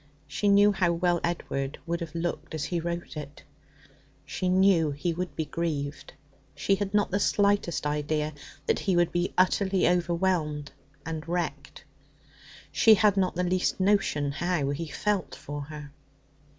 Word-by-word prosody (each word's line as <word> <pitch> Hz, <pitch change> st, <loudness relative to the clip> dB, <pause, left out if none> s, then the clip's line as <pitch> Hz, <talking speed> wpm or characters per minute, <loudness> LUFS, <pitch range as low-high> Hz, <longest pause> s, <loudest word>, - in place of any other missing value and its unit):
She 150 Hz, +8 st, -1 dB
knew 205 Hz, +1 st, +6 dB
how 180 Hz, -3 st, +1 dB
well 175 Hz, 0 st, +1 dB
Edward 140 Hz, -5 st, -2 dB
would 170 Hz, 0 st, -2 dB
have 165 Hz, -1 st, -6 dB
looked 170 Hz, -1 st, -3 dB
as 155 Hz, -, -3 dB
he 170 Hz, +3 st, -1 dB
wrote 170 Hz, 0 st, -4 dB
it. 145 Hz, -1 st, -8 dB, 0.8 s
She 185 Hz, -, -2 dB
knew 185 Hz, -4 st, +4 dB
he 145 Hz, +4 st, -2 dB
would 180 Hz, +2 st, -4 dB
be 160 Hz, -, -2 dB
grieved. 145 Hz, -4 st, -4 dB, 0.4 s
She 195 Hz, -, +1 dB
had 195 Hz, 0 st, -1 dB
not 205 Hz, -1 st, +1 dB
the 200 Hz, -, +1 dB
slightest 200 Hz, -7 st, +1 dB
idea 150 Hz, +1 st, -1 dB, 0.3 s
that -, -, +1 dB
he 190 Hz, -3 st, 0 dB
would 175 Hz, -1 st, +3 dB
be 175 Hz, +1 st, 0 dB
utterly 190 Hz, +1 st, +3 dB
overwhelmed 170 Hz, -4 st, 0 dB, 0.3 s
and 160 Hz, 0 st, -5 dB
wrecked. 175 Hz, 0 st, -3 dB, 0.9 s
She 220 Hz, -1 st, +6 dB
had 205 Hz, 0 st, +3 dB
not 185 Hz, -2 st, +1 dB
the 180 Hz, -, 0 dB
least 180 Hz, +1 st, 0 dB
notion 190 Hz, -8 st, +2 dB
how 170 Hz, -2 st, -1 dB
he 160 Hz, +3 st, -4 dB
felt 185 Hz, 0 st, -1 dB
for 145 Hz, 0 st, -6 dB
her. 150 Hz, -1 st, -9 dB
170 Hz, 155 wpm, -27 LUFS, 150-185 Hz, 0.9 s, knew